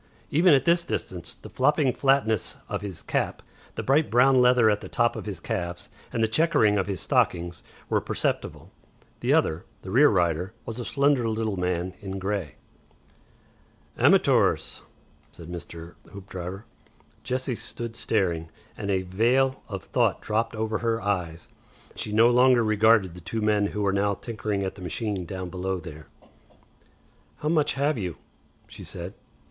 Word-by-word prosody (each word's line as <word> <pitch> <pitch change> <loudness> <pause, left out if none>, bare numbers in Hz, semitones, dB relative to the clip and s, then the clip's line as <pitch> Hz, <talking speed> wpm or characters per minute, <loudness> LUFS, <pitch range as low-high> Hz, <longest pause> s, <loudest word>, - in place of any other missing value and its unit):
Even 165 +1 +6
at 135 0 +1
this 170 0 +4
distance 90 - -5
the - - -12
flopping 140 0 +2
flatness 130 -5 +1
of - - -3
his 100 -4 -7
cap, - - -2 0.3
the - - -3
bright 145 +4 +3
brown 125 +2 +5
leather 125 -2 +5
at 105 -1 +2
the - - -8
top 120 -1 +1
of - - -6
his 95 -5 -4
calves, 90 -3 -4 0.2
and 115 - 0
the - - +4
chequering 110 -6 +3
of 95 - -1
his 95 -3 -3
stockings 85 0 0 0.3
were - - +1
perceptible. - - -3 0.5
The - - +1
other, 80 +3 +2 0.2
the 95 - -7
rear 140 +7 +6
rider, 90 0 0
was 115 +1 -5
a 120 - -4
slender 140 -4 +2
little 110 -2 -1
man 90 0 -2
in 95 -1 -5
grey. 95 -6 -3 1.4
"Amatoors," - - +3 0.5
said 85 -1 -12
Mr. 85 -1 -8 0.2
Hoopdriver. 95 0 -7 0.6
Jessie 130 +1 -2
stood 115 0 -5
staring, 85 -8 -1 0.3
and 100 - -5
a 95 -1 +1
veil 125 +8 +1
of 100 -3 -5
thought 120 -6 +1
dropped 115 +2 -1
over 110 0 -1
her 115 -1 0
eyes. 90 -6 -3 0.5
She 105 - -4
no 110 +2 +5
longer 125 -1 +5
regarded 110 -3 +4
the 90 - -11
two 110 +7 -3
men 105 -1 +2
who 105 0 -3
were 100 -1 +1
now 100 0 +1
tinkering 105 -2 -3
at 95 - -3
the 100 - -13
machine 95 +1 -3
down 95 -1 -5
below 95 0 -2
there. 80 -4 -10 1.3
"How 150 - -2
much 155 -3 +2
have 140 -1 +1
you?" 90 -4 -4 0.5
she - - -11
said. - - -7
105 Hz, 160 wpm, -26 LUFS, 95-120 Hz, 1.4 s, Even